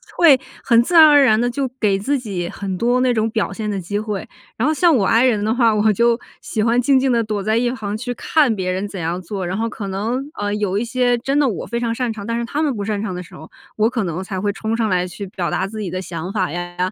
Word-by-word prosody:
会 310 -7 +6 0.2
很 235 -2 +5
自 345 - -3
然 320 -2 +9
而 290 -1 +7
然 215 -3 +4
地 245 - +1
就 270 +1 -2
给 200 -5 +1
自 280 +7 0
己 195 -8 -4
很 190 +1 -5
多 245 +4 +2
那 255 -1 +3
种 220 -1 0
表 220 -3 -1
现 210 +2 -4
的 205 - -2
机 205 +4 -3
会， 210 -2 -4 0.3
然 230 - -1
后 310 - +2
像 335 0 +4
我 205 -6 +2
I 230 +5 +4
人 215 -5 +2
的 220 - +1
话， 230 -3 +3
我 210 +1 +3
就 235 +3 +2 0.2
喜 215 - -2
欢 235 +2 +3
静 275 +2 +4
静 260 0 +2
地 235 - +2
躲 215 -3 -3
在 220 +2 +1
一 240 +1 +1
旁 215 -4 -4
去 245 +2 -4
看 275 -2 +2
别 185 -1 -2
人 190 +3 -2
怎 200 - -8
样 170 +3 -2
做。 190 +1 -5
然 180 +2 -3
后 230 +1 -1
可 205 -2 -6
能， 235 +9 -3
呃， 205 0 -1
有 200 -2 -1
一 225 - -1
些 245 0 +1
真 270 +4 -1
的 295 - +4
我 200 - -4
非 235 0 -3
常 230 -1 0
擅 240 -1 -2
长， 205 -2 -8
但 230 +1 -2
是 235 - -2
他 290 +6 -2
们 290 -4 +1
不 205 -2 -4
擅 210 -1 -2
长 215 -4 -3
的 180 - -5
时 175 - -13
候， 160 - -12 0.2
我 220 +1 +2
可 225 -5 -2
能 175 +2 -3
才 190 -1 -5
会 205 +1 -1
冲 220 +2 -2
上 225 -2 +1
来 180 -1 +1
去 195 +3 -7
表 185 -2 -3
达 190 - -1
自 215 +1 -7
己 195 - -3
的 185 +1 -3
想 175 0 -6
法 185 -5 -1
呀， 175 +2 -6
220 Hz, 310 characters per minute, -20 LUFS, 195-245 Hz, 0.3 s, 然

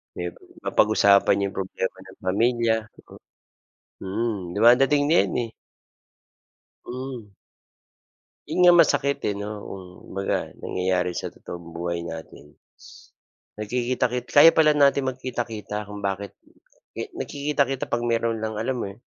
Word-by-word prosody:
Yung 90 0 -4 0.3
mapag-usapan 100 -2 +4
yung - - -13
problema 95 0 -3
ng 95 - -16
pamilya, 115 +4 +2
mm. - - -17 0.8
Mhm, 110 +3 -2 0.2
dumadating 135 +6 +5
na 160 - +4
'yan, - - -4 0.2
eh. - - -14 1.4
Hmm. 125 -5 -7 1.1
'Yon 160 +4 -3
nga 180 0 +8
masakit 140 -3 +2
eh 105 - +1
'no, 100 +1 -5 0.2
hmm. 90 -2 -9
Kumbaga 95 0 -2 0.2
nangyayari 90 -1 -1
sa - - -4
totoong 85 -1 -10
buhay 85 0 -3
natin 80 -3 -9 0.2
is - - -16 0.5
nagkikita-ki 125 +3 -1
kaya 145 +3 +8
pala 155 -2 +4
natin 140 -2 +4
magkita-kita, 115 -5 -4
kung 105 -1 -8
bakit 100 +1 -3 0.6
eh - - -5
nagkikita-kita 140 -2 -1
'pag 120 - +1
mayro'n 115 -1 0
lang 110 0 -3
alam 130 +4 -1
mo - - -2
yon, 100 +4 -12
110 Hz, 130 wpm, -24 LUFS, 95-130 Hz, 1.4 s, nga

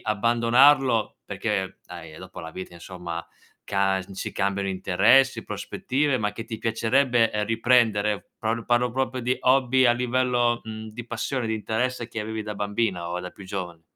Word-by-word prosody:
abbandonarlo 115 +3 +3
perché 95 -2 -3
dai, 80 -2 -10
eh, 75 - -11
dopo 95 0 -11
la 80 -2 -7
vita 95 0 -8
insomma, 85 -1 -7 0.4
ca 95 -1 +1
n 95 +1 -9
si - - -4
cambiano 100 0 -1
interessi, 95 +7 +3
prospettive, 140 0 -1
ma 105 -2 0
che 110 +2 -7
ti 110 - -6
piacerebbe, 115 +1 +2
uhm, 105 0 +1
riprendere, 115 -3 +2
parlo 115 +1 -2
parlo 120 0 +2
proprio 130 -1 -1
di 125 +2 0
hobby 130 0 +4
a 120 - +6
livello, 120 -1 +1
mhmm, 110 0 -7
di 120 +2 -8
passione, 120 +1 -2
di 110 - 0
interesse 115 +3 -2
che 115 -2 -5
avevi 110 0 -4
da 105 0 -5
bambina 100 -4 -1
o 90 - -2
da 90 - -7
più 100 - -13
giovane? 90 -3 -6
110 Hz, 170 wpm, -25 LUFS, 95-120 Hz, 0.4 s, a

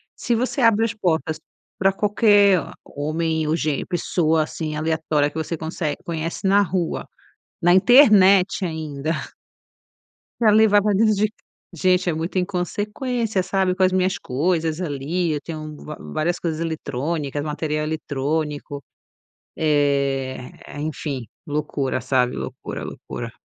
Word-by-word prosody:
Se 240 - 0
você 255 +3 -1
abre 225 -1 +4
as 230 - -2
portas 160 -6 -1 0.4
para 195 +1 +4
qualquer 205 -2 +4 0.3
homem 160 +1 -2
ou 155 - +2
gênero, 155 -4 -1
pessoa, 160 -2 +1
assim, 155 0 -5
aleatória 155 -1 0
que 150 - -23
você 160 +1 -2
consegue 160 -1 -3
conhece 165 +2 -4
na 200 +1 +5
rua, 180 -3 -2 0.5
na 175 +1 +5
internet 200 -4 +6
ainda. 155 -2 -3 1.3
Pra 220 -2 +6
levar 210 -1 +5
pra 210 -1 +2
dentro 215 +2 +4
c 205 +2 +2 0.5
de 165 - -10
gente 180 -1 +3
é - - +1
muito 165 +4 -3
inconsequência, 205 +4 -2
sabe 190 0 0
com 190 - +1
as 185 - +4
minhas 185 0 +1
coisas 160 +3 -1
ali. 165 +1 -2
Eu 145 - -3
tenho 155 -1 -7
vá 150 - -7
várias 170 +3 -2
coisas 160 -2 -3
eletrônicas, 150 -2 -3
material 150 0 -2
eletrônico, 150 -1 -3 0.7
eh, 140 -4 0 0.3
enfim, 145 -5 -4 0.2
loucura, 145 -3 -2
sabe 125 -2 +1
loucura, - - -6
loucura. - - -7
160 Hz, 135 wpm, -22 LUFS, 150-190 Hz, 1.3 s, internet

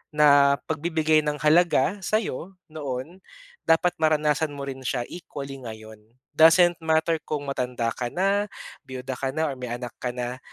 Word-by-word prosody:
na 140 -2 +6
pagbibigay 160 0 +2
ng 150 0 0
halaga 170 +3 +3
sa'yo, 195 - -2 0.2
noon. 145 +3 -5 0.5
Dapat 175 +2 +3
maranasan 155 -1 +2
mo 140 - -6
rin 135 -1 -6
siya 125 -1 -1
equally 140 -5 -8
ngayon, 110 -2 -10 0.3
doesn't 165 +3 +6
matter 160 0 +1
kung 150 -1 -2
matanda 125 -3 -2
ka 120 +1 -3
na, 200 +3 +1 0.4
biyuda 130 0 -6
ka 135 0 -2
na 160 -1 0
or - - -6
may 125 - -5
anak 120 0 -5
ka 125 - -2
na. 125 +1 -4
150 Hz, 155 wpm, -25 LUFS, 130-165 Hz, 0.5 s, na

